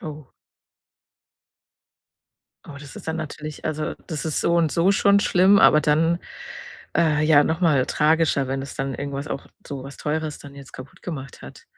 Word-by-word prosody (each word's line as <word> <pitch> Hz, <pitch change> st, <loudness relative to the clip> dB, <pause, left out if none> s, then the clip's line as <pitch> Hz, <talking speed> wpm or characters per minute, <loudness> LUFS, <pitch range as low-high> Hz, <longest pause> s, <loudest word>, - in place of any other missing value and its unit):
Oh. 150 Hz, -3 st, -9 dB, 2.4 s
Oh, 140 Hz, -, -9 dB
das 145 Hz, -2 st, -12 dB
ist -, -, -9 dB
dann 160 Hz, -, -2 dB
natürlich 150 Hz, -1 st, -7 dB
also, 155 Hz, 0 st, -3 dB
das 155 Hz, -4 st, -5 dB
ist 155 Hz, -, -1 dB
so 170 Hz, -, +1 dB
und 165 Hz, -2 st, +2 dB
so 170 Hz, +6 st, +2 dB
schon 200 Hz, 0 st, +4 dB
schlimm, 190 Hz, +1 st, +4 dB
aber 150 Hz, -7 st, +6 dB
dann, 165 Hz, +3 st, +2 dB, 0.8 s
äh, 155 Hz, -3 st, +2 dB
ja 155 Hz, -2 st, +6 dB
noch 160 Hz, +2 st, -1 dB
mal 150 Hz, -7 st, +3 dB
tragischer, 150 Hz, -3 st, +1 dB
wenn 135 Hz, 0 st, -2 dB
es 140 Hz, -, -8 dB
dann 135 Hz, 0 st, -3 dB
irgendwas 140 Hz, +2 st, -5 dB
auch -, -, -5 dB, 0.2 s
so 140 Hz, -2 st, -6 dB
was 140 Hz, -, -10 dB
Teures 155 Hz, 0 st, -3 dB
dann 140 Hz, -1 st, -12 dB
jetzt 140 Hz, -1 st, -13 dB
kaputt 130 Hz, +1 st, -12 dB
gemacht 135 Hz, -6 st, -7 dB
hat. -, -, -12 dB
150 Hz, 175 wpm, -23 LUFS, 140-165 Hz, 2.4 s, aber